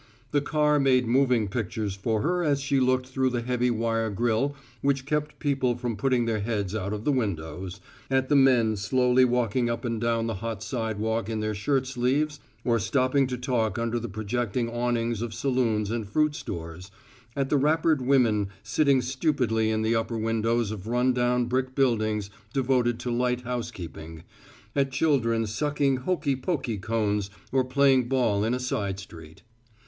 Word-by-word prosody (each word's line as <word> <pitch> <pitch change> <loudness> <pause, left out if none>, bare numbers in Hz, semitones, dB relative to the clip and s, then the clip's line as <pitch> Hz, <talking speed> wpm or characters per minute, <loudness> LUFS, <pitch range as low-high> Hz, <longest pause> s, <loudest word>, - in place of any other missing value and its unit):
The 145 - +2
car 150 0 +2
made 130 -2 +3
moving 125 -2 +2
pictures 105 -1 -3
for 105 +2 -1
her 175 +3 +1
as 145 -3 +2
she 140 0 +1
looked 130 0 +2
through 130 0 0
the 120 -1 -2
heavy 125 0 0
wire 115 -1 0
grill 120 +6 0 0.3
which 135 -1 +1
kept 150 +1 -2
people 130 -4 0
from 120 -2 -3
putting 125 +2 +1
their 115 -2 0
heads 100 -2 -2
out 100 -2 -2
of 105 0 -4
the 145 - +2
windows, 95 - -3 0.3
at 130 0 +1
the 145 - +2
men 125 -5 +4
slowly 125 +5 +3
walking 120 -1 +1
up 115 +2 -3
and 115 -2 -2
down 115 -1 +1
the 115 - -2
hot 115 -3 -4
sidewalk 110 -1 -2
in 110 -1 -2
their 110 0 -1
shirt 130 +6 0
sleeves 135 +4 0 0.3
or 120 -2 +2
stopping 130 +5 +2
to 125 -1 -3
talk 120 -5 -1
under 115 0 -1
the 120 - -5
projecting 115 +3 -2
awnings 120 -2 -1
of 115 -2 -4
saloons 115 -4 0
and 115 -3 -3
fruit 150 +5 +2
stores, 85 - -7 0.5
at 135 -1 -1
the 145 - +4
wrappered 155 +1 +2
women 120 -6 +3 0.2
sitting 130 +3 +2
stupidly 125 -5 0
in 110 0 0
the 110 +1 +2
upper 115 +1 -1
windows 115 0 0
of 105 -1 -7
run 125 +2 +2
down 125 0 +1
brick 130 +1 -1
buildings 110 -6 +1 0.2
devoted 125 -3 +1
to 125 - -3
light 125 +1 0
housekeeping, 85 -10 -6 0.5
at 135 -1 +1
children 125 -6 +1
sucking 140 +4 0
hokey 140 0 0
pokey 130 - -2
cones 105 -2 -1 0.2
or 130 -1 +3
playing 130 -1 +3
ball 115 -6 +2
in 115 +3 +1
a - - -3
side 100 -6 -2
street. 80 -4 -12
120 Hz, 175 wpm, -26 LUFS, 110-130 Hz, 0.5 s, men